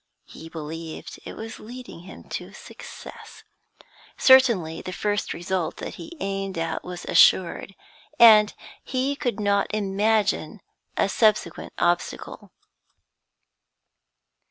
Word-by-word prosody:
He 165 - -12
believed 160 0 -8
it - - -8
was 225 0 -8
leading 245 -4 -10
him 185 +3 -12
to - - -6
success. - - -12 0.7
Certainly 235 -12 +5
the 185 - -6
first 205 +2 -2
result 175 0 -3
that - - -6
he 335 +1 -10
aimed 195 -1 -3
at 165 0 -3
was 180 -1 -8
assured, 185 +1 +3 0.4
and 215 -2 +8 0.3
he 265 +2 -1
could 245 -4 -3
not 200 -1 +1
imagine 210 +1 0 0.4
a - - +3
subsequent 215 -3 +1
obstacle. 175 0 -2
200 Hz, 110 wpm, -24 LUFS, 175-225 Hz, 0.7 s, and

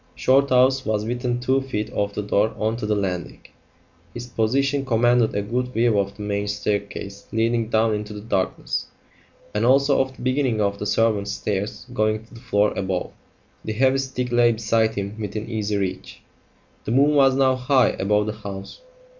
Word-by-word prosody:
Shorthouse 130 0 +3
was 105 -1 -1
within 120 +1 -2
two 130 +2 +1
feet 110 -6 -4
of 100 0 -1
the 105 - -2
door 105 +2 +1
on 110 +1 0
to 110 - -4
the 105 - +1
landing; 90 -4 -3 0.7
his 120 0 -5
position 135 +4 0
commanded 120 -2 +2
a 100 - 0
good 125 +4 -1
view 115 -3 +2
of 100 0 -2
the 105 - -6
main 100 0 -2
staircase 100 -1 -3
leading 115 0 0
down 110 -1 +2
into 105 0 -4
the 105 -1 -7
darkness, 95 -4 -2 0.7
and 105 - 0
also 135 +3 +4
of 130 0 -3
the - - -11
beginning 130 -3 +1
of 100 -1 0
the 105 - -3
servants' 105 -3 +1
stairs 100 0 -3
going 110 -1 0
to 115 - -20
the 115 - -11
floor 105 -4 +1
above; 95 -2 -2 0.5
the 110 - -3
heavy 130 +4 +3
stick 130 -2 -3
lay 120 0 +4
beside 110 0 +1
him 100 +1 -4
within 105 +1 -4
easy 105 -2 -2
reach. 95 -1 -4 0.6
The - - -2
moon 140 +4 +4
was 135 -2 +5
now 130 -1 +3
high 130 -1 +3
above 105 +2 +1
the 110 - -3
house. 100 - -8
110 Hz, 180 wpm, -23 LUFS, 105-125 Hz, 0.7 s, was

